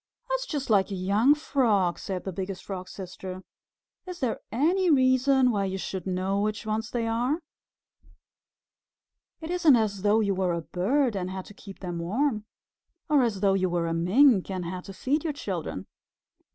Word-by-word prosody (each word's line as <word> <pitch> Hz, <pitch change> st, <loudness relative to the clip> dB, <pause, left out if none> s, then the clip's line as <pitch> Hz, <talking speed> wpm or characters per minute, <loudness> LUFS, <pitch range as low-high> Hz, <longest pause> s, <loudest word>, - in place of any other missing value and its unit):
"That's -, -, -1 dB
just 280 Hz, -, -3 dB
like 195 Hz, -2 st, +4 dB
a 195 Hz, -, -3 dB
young 205 Hz, +10 st, +3 dB
Frog," 220 Hz, -, +1 dB
said 185 Hz, -2 st, -4 dB
the 190 Hz, -, -4 dB
Biggest 190 Hz, +1 st, -5 dB
Frog's 185 Hz, -2 st, -6 dB
Sister. 185 Hz, 0 st, -8 dB, 0.6 s
"Is 360 Hz, -1 st, -7 dB
there 245 Hz, -4 st, -1 dB
any 345 Hz, -, +2 dB
reason 260 Hz, -2 st, +4 dB
why 200 Hz, -3 st, 0 dB
you 190 Hz, 0 st, -3 dB
should 190 Hz, -1 st, -5 dB
know 190 Hz, +2 st, 0 dB
which 210 Hz, 0 st, -2 dB
ones 220 Hz, +1 st, -2 dB
they 235 Hz, -2 st, -2 dB
are? 240 Hz, +6 st, 0 dB, 2.0 s
It 320 Hz, +1 st, -5 dB
isn't 340 Hz, -6 st, +5 dB
as 210 Hz, -4 st, 0 dB
though 210 Hz, +2 st, +3 dB
you 200 Hz, -3 st, +1 dB
were 185 Hz, -2 st, 0 dB
a 170 Hz, -, -2 dB
bird 235 Hz, -, 0 dB
and 185 Hz, -1 st, -2 dB
had 190 Hz, 0 st, -6 dB
to -, -, -12 dB
keep 195 Hz, -1 st, -12 dB
them 175 Hz, -2 st, -4 dB
warm, 215 Hz, +5 st, -1 dB, 0.6 s
or 295 Hz, -2 st, +5 dB
as 220 Hz, -6 st, 0 dB
though 195 Hz, -2 st, +4 dB
you 185 Hz, -1 st, +1 dB
were 175 Hz, -1 st, 0 dB
a 165 Hz, -, -1 dB
Mink 195 Hz, +6 st, +4 dB
and 185 Hz, -2 st, -3 dB
had 180 Hz, +1 st, -5 dB
to 195 Hz, -, -8 dB
feed 275 Hz, +10 st, -1 dB
your 315 Hz, -3 st, -1 dB
children. 175 Hz, -, -4 dB
205 Hz, 180 wpm, -27 LUFS, 185-260 Hz, 2.0 s, isn't